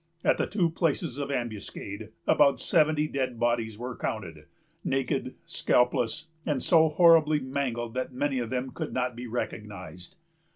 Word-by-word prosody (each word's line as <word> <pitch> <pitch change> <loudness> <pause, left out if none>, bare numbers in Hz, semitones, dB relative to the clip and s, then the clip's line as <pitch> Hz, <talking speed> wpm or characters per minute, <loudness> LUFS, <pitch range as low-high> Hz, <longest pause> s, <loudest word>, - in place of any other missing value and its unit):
At - - +3
the - - +1
two 180 -6 +1
places 160 -4 -1
of 140 -1 -3
ambuscade, 110 -4 -5 0.2
about 140 -2 +4
seventy 155 -1 +2
dead 130 -5 -2
bodies 115 -2 0
were 125 +1 -5
counted, 85 -8 -5 0.4
naked, 135 -1 -1
scalpless, 125 +4 +1 0.2
and 145 -5 -1
so 160 -2 +5
horribly 155 -2 +5
mangled 130 -4 -3
that 130 +1 -3
many 135 +1 -1
of 120 -2 -3
them 130 +1 -2
could - - -5
not 125 -1 -1
be 120 +1 -6
recognized. 105 - -6
130 Hz, 150 wpm, -28 LUFS, 120-150 Hz, 0.4 s, so